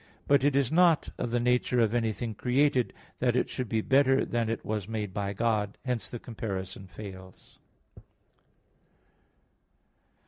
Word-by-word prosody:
But 140 -2 +4
it 145 -1 +3
is 140 -3 +2
not 170 -1 +4
of 120 - -1
the 120 +1 +1
nature 125 0 +2
of 115 -1 +3
anything 115 -1 -1
created, 130 +3 +2 0.3
that 125 -1 +2
it 125 - +1
should 125 -4 -4
be 110 -1 +1
better 135 +2 +3
than 115 -1 -1
it 115 - -3
was 105 -3 -2
made 105 -4 -4
by 100 0 -2
God. 105 -1 0
Hence 125 -3 -2
the 120 - -5
comparison 100 -5 -6
fails. 95 -1 -11
115 Hz, 145 wpm, -29 LUFS, 105-125 Hz, 0.3 s, But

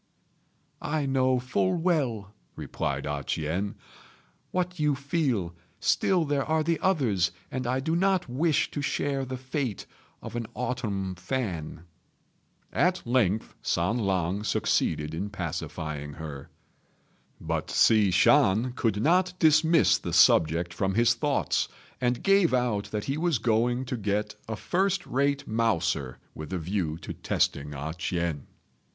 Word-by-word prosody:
"I 150 -1 -1
know 130 -1 +2
full 110 -7 0
well," 130 - 0 0.2
replied 70 0 -3
A 75 -1 -3
ch'ien, 85 +9 -2 0.7
"what 180 -1 -2
you 150 -2 +2
feel; 135 - -1 0.3
still 180 -4 +2
there 145 -2 0
are 160 +1 +1
the 165 +1 0
others, 120 - +1 0.2
and 130 -1 -3
I 130 +2 +1
do 160 +4 0
not 190 0 +2
wish 145 +5 +1
to 145 - -3
share 140 -1 -1
the 130 0 -5
fate 130 -3 -3 0.4
of - - -7
an 120 -2 -3
autumn 115 -7 -2
fan." 90 - -4 0.9
At 180 +1 +1
length 115 -4 +1
San 90 +8 0
lang 95 -1 0
succeeded 75 -6 0
in 95 +6 -3
pacifying 75 -5 -5
her; 75 -3 -8 0.9
but - - -3
Hsi 110 -3 +4
Shan 105 +6 +4
could 110 -4 0
not 180 +4 +3
dismiss 160 0 +4
the - - -5
subject 85 +2 +4
from 95 -1 -1
his 115 +1 +4
thoughts, - - 0 0.3
and 125 -1 0
gave 195 -8 +4
out 120 -5 0
that 105 -1 -4
he 140 +3 -2
was 170 -4 +2
going 120 +3 +1
to 125 0 -3
get 105 0 -1 0.2
a 110 - -2
first 190 - 0
rate 140 +1 0
mouser, 85 - 0 0.2
with 75 +2 -8
a 95 - -1
view 85 -2 -2
to 80 - -7
testing 70 +1 -1
A 75 +3 -4
ch'ien. 85 -4 -3
115 Hz, 140 wpm, -27 LUFS, 90-140 Hz, 0.9 s, Hsi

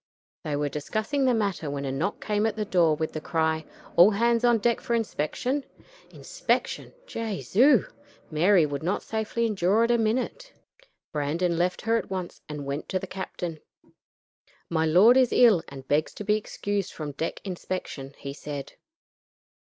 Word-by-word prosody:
They 150 -2 -2
were 145 0 0
discussing 215 - -1
the 255 - +4
matter 200 -8 -1
when 140 0 -3
a 135 - -2
knock 155 +10 -2
came 210 0 +1
at 220 - -2
the 215 -1 -2
door 170 -6 +3
with 160 +1 -3
the 155 - -4
cry, 160 -1 0 0.3
"All 175 +4 +8
hands 230 +3 +2
on 240 -1 +5
deck 235 +2 +1
for 235 - 0
inspection." 230 - -1 0.5
Inspection! - - -2
Jesu! 230 - +2 0.5
Mary 170 +2 +4
would 145 -1 -4
not 180 +5 -1
safely 220 +1 -1
endure 205 0 +2
it 230 - +2
a 235 - +3
minute. 250 - -1 0.6
Brandon 160 +4 0
left 175 +2 0
her 225 +1 +2
at - - -4
once 185 -2 -5
and 150 -2 -5
went 140 +2 -4
to 190 - 0
the 185 - -4
captain. 180 -3 -5 1.1
"My 160 -1 +2
lord 200 +10 +6
is 255 -2 +4
ill, 225 -8 +6
and 135 -1 -10
begs 150 +2 +1
to - - -6
be 210 +1 +2
excused 205 -2 -3
from 150 -2 -5
deck 160 +4 -4
inspection," 175 -7 -5
he 140 - -6
said. 145 -1 -7
185 Hz, 170 wpm, -26 LUFS, 155-225 Hz, 1.1 s, All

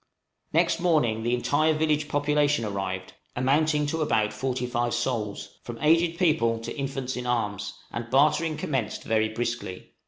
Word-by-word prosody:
Next 170 +1 +2
morning 150 -11 +2
the 120 +2 +1
entire 155 +5 +2
village 155 -1 +1
population 145 -3 +1
arrived, 95 -2 -4 0.2
amounting 150 +4 +2
to 160 +2 -2
about 110 -8 +1
forty 125 +2 -2
five 120 -1 -1
souls, 120 -4 -3
from 120 -1 -7
aged 165 +2 +3
people 155 -11 +2
to - - -6
infants 135 -2 -3
in 125 0 -4
arms, 105 -5 -1 0.2
and 120 0 -5
bartering 155 +4 +3
commenced 130 -7 -2
very 110 -1 +1
briskly. 115 -4 -4
130 Hz, 150 wpm, -26 LUFS, 115-150 Hz, 0.2 s, aged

